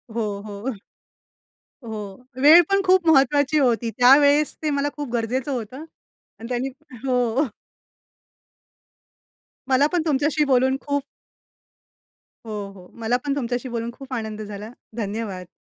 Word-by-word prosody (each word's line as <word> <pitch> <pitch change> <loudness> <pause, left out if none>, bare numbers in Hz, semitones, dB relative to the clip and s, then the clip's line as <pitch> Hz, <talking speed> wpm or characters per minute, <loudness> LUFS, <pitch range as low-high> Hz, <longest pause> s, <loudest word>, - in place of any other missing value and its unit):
हो, 235 - 0 0.2
हो, 205 +3 -6 1.2
हो. 210 +1 -7 0.2
वेळ 315 +5 +9
पण 395 0 +3
खूप 370 -2 +4
महत्त्वाची 285 +1 +4
होती. 240 -4 +1
त्यावेळेस 285 +4 +5
ते 310 - +1
मला 285 0 0
खूप 290 -3 -5
गरजेचं 245 +4 -1
होतं. 255 +3 -5 0.6
आणि 230 - -8
त्यांनी 250 +2 -1 0.4
हो. 250 +2 +1 2.2
मला 270 +2 +4
पण 350 - +2
तुमच्याशी 300 0 +1
बोलून 265 -1 +3
खूप 285 -1 -1 1.4
हो, 220 - -7 0.2
हो. 180 -2 -14
मला 230 +2 +1
पण 280 -1 0
तुमच्याशी 245 -1 -3
बोलून 235 0 -3
खूप 265 +1 -10
आनंद 220 -3 -4
झाला. 210 +1 -8 0.3
धन्यवाद. 205 -4 -4
255 Hz, 125 wpm, -23 LUFS, 225-285 Hz, 2.2 s, वेळ